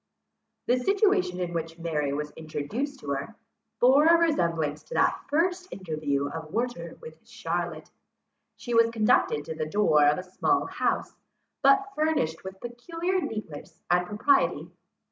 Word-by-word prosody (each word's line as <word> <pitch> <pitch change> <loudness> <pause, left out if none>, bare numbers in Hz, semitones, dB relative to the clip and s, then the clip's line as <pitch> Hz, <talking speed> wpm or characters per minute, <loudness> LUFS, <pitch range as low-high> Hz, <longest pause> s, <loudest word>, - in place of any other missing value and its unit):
The 250 +1 +2
situation 390 - +2
in 175 -1 -3
which 165 0 -4
Mary 155 -4 -1
was 150 +1 -3
introduced 200 - -5
to 145 - -7
her, 140 +11 -4 0.4
bore 270 +5 +6
a 335 0 +7
resemblance 170 - 0
to - - -8
the - - +4 0.2
first 360 +4 +1
interview 155 -6 -2
of 160 +1 -7
Werter 245 +4 -3
with 475 - -12
Charlotte. - - -4 0.7
She 240 - -5
was 230 0 +5
conducted 215 -9 +2
to 160 - -5
the 155 -1 -3
door 155 -6 +4
of 150 - +3
a 185 - -4
small 190 - 0
house, - - -1 0.5
but 290 +9 +4
furnished 300 - 0
with 190 0 -8
peculiar 330 +10 -3
neatness 215 - -7
and 180 0 +3
propriety. 210 +8 +1
210 Hz, 145 wpm, -27 LUFS, -, 0.7 s, a